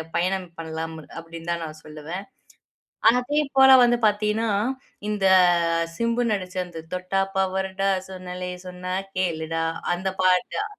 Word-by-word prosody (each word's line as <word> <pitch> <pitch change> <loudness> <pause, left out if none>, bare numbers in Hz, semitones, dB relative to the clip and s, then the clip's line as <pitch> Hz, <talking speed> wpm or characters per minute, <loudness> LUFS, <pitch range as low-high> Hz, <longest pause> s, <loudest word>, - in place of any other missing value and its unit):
பயணம் 185 +1 0
பண்ணலாம் 160 0 -5 0.2
அப்படின்னு 165 0 -9
தா 170 - +1
நா 160 - -4
சொல்லுவன். 155 +5 -7 0.9
அதே 265 +5 +1 0.2
போல 265 0 +8
வந்து 240 0 +4
பாத்தீங்கன்னா, 210 +2 +1 0.6
இந்த 210 -2 -1 0.7
சிம்பு 235 +1 +1
நடிச்ச 185 -2 -3
அந்த, 175 -2 -9
"தொட்டா 185 +1 0
பவரு 190 0 0
டா 195 0 +3 0.2
சொன்னாலே 180 -1 -6
சொன்னா 180 0 -6 0.2
கேளுடா" 165 -3 -1 0.3
அந்த 190 +2 -2
பாட்டு 185 - +2
185 Hz, 120 wpm, -24 LUFS, 170-205 Hz, 0.9 s, போல